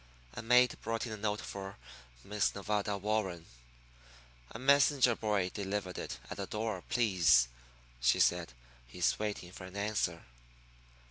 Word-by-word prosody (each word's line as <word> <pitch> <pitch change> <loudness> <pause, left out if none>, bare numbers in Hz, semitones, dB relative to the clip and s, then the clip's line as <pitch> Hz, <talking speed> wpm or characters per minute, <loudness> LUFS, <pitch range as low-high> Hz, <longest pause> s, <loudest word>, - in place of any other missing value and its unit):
A - - -6
maid 125 +2 +4
brought 115 +1 -2
in 115 - -6
a 110 - -4
note 105 0 -1
for 95 0 -7 0.5
Miss 105 0 0
Nevada 105 0 -1
Warren. 100 -5 -1 1.0
"A - - -8
messenger 135 -1 +4
boy 105 -5 0
delivered 100 -2 -3
it - - -5
at - - -7
the 100 -1 -4
door, 105 -3 -3
please," 85 - +4 0.5
she 60 0 +3
said. 85 -6 +2 0.4
"He's 85 +8 0
waiting 105 -4 -4
for 90 - -9
an 95 +2 -9
answer." 100 -5 -1
105 Hz, 140 wpm, -33 LUFS, 90-110 Hz, 1.0 s, maid